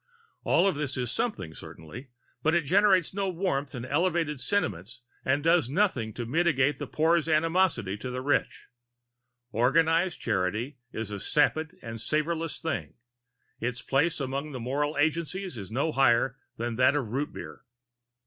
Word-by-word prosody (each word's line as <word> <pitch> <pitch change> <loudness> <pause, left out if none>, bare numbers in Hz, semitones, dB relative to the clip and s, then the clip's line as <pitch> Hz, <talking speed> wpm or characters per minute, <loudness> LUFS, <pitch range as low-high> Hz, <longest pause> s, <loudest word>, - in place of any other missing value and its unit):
All 195 - +4
this 145 -3 -3
is 125 -2 -1
something, 140 - -2
certainly, 95 - -10 0.3
but 160 +4 +2
it 170 - +3
generates 190 +1 +4
no 195 0 -1
warm 165 -6 -1
and 125 -3 -6
elevated 160 0 0
sentiments 120 - -2 0.2
and 140 +2 +1
does 165 -5 +3
nothing 140 - +1
in 120 -1 -4
mitigation 150 -4 +3
of 135 - -22
the - - -4
poor's 165 +1 +2
animosity 160 - +2
to 130 - -5
the 125 0 -4
rich. 145 +1 0 0.9
Organized 165 - +2
charity 110 +9 -1
is 110 -2 -5
a 100 - -4
sapid 155 +6 +1
and 115 -2 -6
savorless 160 +3 -1
thing; 160 -4 -3 0.6
its 125 +1 -3
place 155 +5 +1
among 140 +2 -3
moral 140 +5 -2
agencies 165 +3 -1
is 100 -5 -7
no 140 +7 0
higher 130 -2 +3 0.2
than 115 0 -3
that 130 +3 +4
of 145 -4 0
root 140 +6 -2
beer. 75 -1 -9
145 Hz, 150 wpm, -28 LUFS, 125-165 Hz, 0.9 s, All